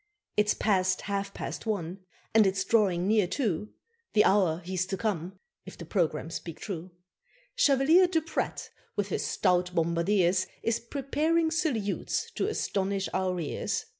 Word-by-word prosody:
It's 210 0 +3
past 185 -3 +1
half 200 0 -3
past 225 - -6
one, 190 -3 -2 0.3
and 215 -2 +6
it's 195 0 0
drawing 195 -5 +2
near 210 -3 +3
two 210 - -2 0.4
The 210 - +6
hour 185 -5 +3
he's 185 0 -1
to 195 - -3
come, 190 -3 -2 0.3
if 190 - -11
the 170 - -8
programme 160 -2 -1
speak 165 -1 -6
true. 180 -3 -5 0.6
Chevalier 325 - +5
Duprat, 325 -2 -2 0.2
with 205 -1 -1
his - - -1
stout 180 0 +1
bombardiers, 170 +3 +2 0.2
Is 230 -1 +1
preparing 310 +6 0
salutes 240 - -1
to - - -1
astonish 195 0 -1
our 185 -1 0
ears. 155 - -2
195 Hz, 140 wpm, -28 LUFS, 180-220 Hz, 0.6 s, and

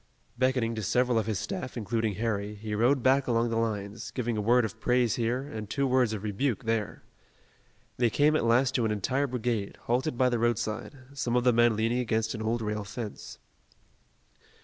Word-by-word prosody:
Beckoning 125 -2 +1
to 110 - -4
several 125 +4 +2
of 110 - -3
his 110 -3 -1
staff, 110 +5 -5
including 110 -1 -1
Harry, 105 -1 -2
he 105 +1 -6
rode 120 +4 +2
back 135 +1 +3
along 115 -1 +1
the - - 0
lines, 110 -1 -2
giving 120 -2 -2
a 105 - -1
word 120 +3 +4
of 105 - -7
praise 125 -2 +2
here 120 +2 -1
and 110 -7 -7
two 140 +4 0
words 130 -3 +2
of 110 -2 -4
rebuke 110 +4 -1
there. 115 -3 -2 0.9
They 120 -1 +3
came 150 +6 +3
at - - +1
last 125 +3 +3
to 120 - +1
an - - +1
entire 130 +7 0
brigade, 120 -5 -2
halted 125 +3 0
by 130 0 +4
the 120 -2 0
roadside, 120 +3 -1 0.2
some 120 -3 -1
of 125 - +3
the 125 -1 +4
men 120 -1 +4
leaning 115 +3 +1
against 110 -2 0
an 110 - -5
old 115 +1 -1
rail 105 0 -2
fence. 105 +1 -7
115 Hz, 195 wpm, -28 LUFS, 110-125 Hz, 0.9 s, word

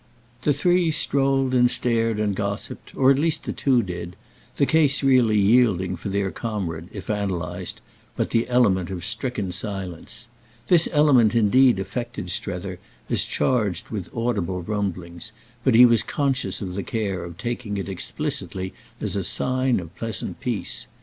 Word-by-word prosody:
The 150 - +2
three 175 +4 +2
strolled 135 -4 +1
and 125 -1 +5
stared 115 -3 +1
and 105 -2 0
gossiped, 100 0 -5
or 135 0 +5
at 135 - +2
least 160 +1 0
the - - -4
two 130 -4 +2
did; 90 -2 -6 0.4
the 140 - +3
case 145 -2 +3
really 125 -5 +4
yielding 100 -4 +3
for 90 +4 -6
their 100 -1 -1
comrade, 95 -7 -4
if - - -8
analysed, 90 -5 -3 0.3
but - - -1
the 115 +1 +1
element 100 -8 +3
of 90 -3 -4
stricken 115 -8 -3
silence. 95 +3 -6 0.4
This 170 -2 +5
element 135 -8 +4
indeed 120 +2 +5
affected 100 -1 -4
Strether 90 +1 -3 0.3
as - - +3
charged 105 -9 0
with 100 -6 -5
audible 100 -7 -2
rumblings, 95 -1 -4 0.3
but 130 -4 +3
he 125 +2 +9
was 115 -2 +4
conscious 135 -6 -1
of 90 -2 -5
the 100 - -3
care 100 -3 -2
of 85 -1 -9
taking 115 -1 -4
it 100 - -4
explicitly 95 0 -4 0.3
as - - -2
a - - -1
sign 130 -2 +1
of 85 0 -10
pleasant 115 -3 -3
peace. 120 -6 -3
110 Hz, 155 wpm, -23 LUFS, 95-125 Hz, 0.4 s, he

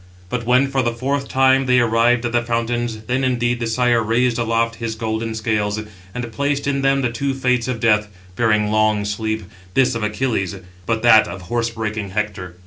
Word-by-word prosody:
But 120 +1 -3
when 125 +2 +4
for 135 -1 0
the 120 -1 -1
fourth 135 +3 -2
time 130 0 +3
they 125 0 +4
arrived 115 +1 +2
at 120 - -1
the 120 0 +2
fountains, 120 -1 -2
then, 125 +3 -1
indeed, 120 -1 0
the 115 - -2
Sire 120 0 +2
raised 115 +2 +1
aloft 115 0 0
his 115 -1 -4
golden 110 0 -3
scales, 110 -1 -1 0.4
and 120 -2 -4
placed 140 +3 -1
in 140 -1 0
them 135 0 +2
the 120 - 0
two 135 +3 -2
fates 125 -3 0
of 125 -3 -2
death, 105 -3 +3 0.3
bearing 105 -1 +2
long 110 -1 +2
sleep, 110 +1 -2 0.3
this 130 -1 +3
of 115 - -3
Achilles, 105 -3 -1 0.3
but 115 0 -1
that 110 -2 +6
of 95 -1 -8
horse 115 +4 -1
breaking 110 -3 -4
Hector. 95 -3 -4
115 Hz, 195 wpm, -20 LUFS, 110-125 Hz, 0.4 s, that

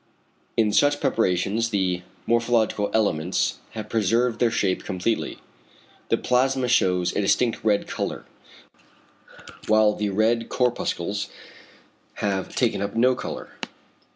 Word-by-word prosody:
In 110 -2 +3
such 145 0 +3
preparations 105 +2 +1
the 95 -4 0 0.2
morphological 115 -3 +1
elements 95 -5 0
have 110 -1 -6
preserved 115 +3 +1
their 120 - +3
shape 100 -5 0
completely. 95 +5 -2 0.7
The - - +3
plasma 130 0 +1
shews 90 -6 +2
a - - +1
distinct 115 +4 +1
red 105 -2 +2
colour, - - -4 1.4
whilst 110 -1 +3
the 105 -1 0
red 110 +4 +1
corpuscles 105 -5 -1 0.9
have 95 -2 -2
taken - - +1
up 100 0 -3
no 125 +3 +4
colour. 125 - -6
110 Hz, 115 wpm, -24 LUFS, 100-115 Hz, 1.4 s, no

